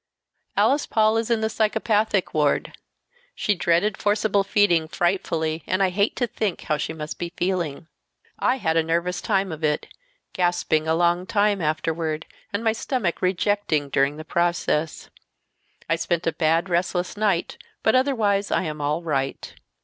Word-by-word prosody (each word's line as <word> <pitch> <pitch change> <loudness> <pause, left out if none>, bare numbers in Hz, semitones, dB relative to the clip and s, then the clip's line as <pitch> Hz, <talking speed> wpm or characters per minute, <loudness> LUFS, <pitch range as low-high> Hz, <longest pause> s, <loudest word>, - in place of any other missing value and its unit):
"Alice 285 +2 +3
Paul 220 0 +3
is 225 0 -1
in 230 -2 +1
the 220 - +1
psychopathic 215 -2 +1
ward. 150 -2 +1 0.6
She 210 - +1
dreaded 180 +3 +1
forcible 205 -1 +2
feeding 195 -5 +3
frightfully, 165 -2 -1
and 185 +1 +1
I 190 - +3
hate 200 +3 +1
to 245 - 0
think 215 -4 -3
how 150 - 0
she - - -3
must 155 -1 -6
be 170 -1 -4
feeling. 175 -6 -1 0.5
I - - +2
had 160 -9 0
a - - +5
nervous 170 +2 -1
time 195 -3 0
of 155 0 -7
it, 150 -1 0 0.5
gasping 175 -3 +1
a 160 - +2
long 175 +2 +1
time 205 -2 +2
afterward, 155 0 -1 0.3
and 200 +3 -2
my 225 - +3
stomach 220 -5 -2
rejecting 185 -5 0
during 140 +2 +1
the 155 - -8
process. 170 -2 -1 0.8
I 165 - +1
spent 170 0 -1
a 165 - +2
bad, 165 +2 +1
restless 180 0 -1
night, 205 -5 0 0.2
but 220 - +3
otherwise 220 -7 +2
I - - +1
am 155 -3 -4
all 150 +4 -1
right. 140 -4 -2
175 Hz, 160 wpm, -24 LUFS, 160-205 Hz, 0.8 s, a